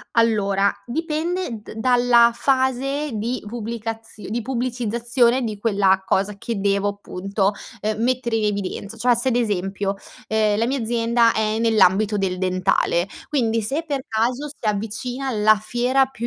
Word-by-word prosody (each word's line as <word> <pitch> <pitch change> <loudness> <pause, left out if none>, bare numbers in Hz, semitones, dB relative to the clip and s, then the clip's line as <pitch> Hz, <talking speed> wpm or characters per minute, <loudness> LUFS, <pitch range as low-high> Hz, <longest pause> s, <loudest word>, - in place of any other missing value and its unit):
Allora, 200 -4 +3
dipende 315 - -3
d - - -10
dalla 240 0 +4
fase 270 +3 0
di 230 +4 -2
pubblicazi 225 -1 -6
di 230 +3 -2
pubblicizzazione 240 0 +1
di 215 -3 -3
quella 200 -3 +2
cosa 195 +2 0
che 220 +1 -4
devo, 200 0 +1
punto, 195 +1 -1 0.3
uhm, 215 +1 -2
mettere 245 -1 0
in 220 - 0
evidenz 200 +1 -3
cioè 245 +1 +3
se 240 +3 0
ad 245 - +1
esempio, 195 -3 -1 0.3
ehm, 215 -1 +2
la 230 - +2
mia 270 +2 -1
azienda 230 0 +2
è 215 0 0
nell'ambito 215 -2 +3
del 190 -2 -1
dentale, 185 -1 +1 0.2
quindi, 230 -6 +1
se 280 +10 -2
per 280 -3 -2
caso 245 +6 -1
si 280 -5 -8
avvicina 225 +6 -3
la 215 -2 +4
fiera 245 +5 +1
più 260 -3 -6
225 Hz, 150 wpm, -22 LUFS, 205-245 Hz, 0.3 s, dalla